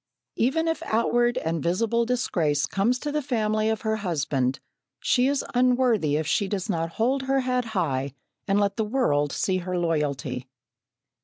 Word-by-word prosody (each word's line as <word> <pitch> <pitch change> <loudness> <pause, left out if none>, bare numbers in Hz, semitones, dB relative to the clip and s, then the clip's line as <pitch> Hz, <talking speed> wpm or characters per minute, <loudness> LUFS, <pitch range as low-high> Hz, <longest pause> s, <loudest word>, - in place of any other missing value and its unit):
Even 320 +8 +1
if 325 - -1
outward 240 +2 +2
and 160 0 -1
visible 230 +8 +1
disgrace 165 - +1
comes 220 +6 +1
to 295 +3 -4
the 300 +1 0
family 215 -5 0
of 220 -1 -1
her 220 -1 0
husband, 140 -9 -1 0.4
she 250 0 +2
is 280 -1 0
unworthy 245 - +3
if 155 +1 0
she 200 +6 +1
does 195 0 -3
not 165 -4 -2
hold 255 +7 +1
her 270 0 +1
head 250 -1 0
high 140 -5 -1 0.3
and 200 0 +2
let 200 0 0
the 220 - +1
world 210 - +1
see 190 -1 0
her 180 0 -3
loyalty. 145 -6 -1
210 Hz, 165 wpm, -25 LUFS, 160-245 Hz, 0.4 s, unworthy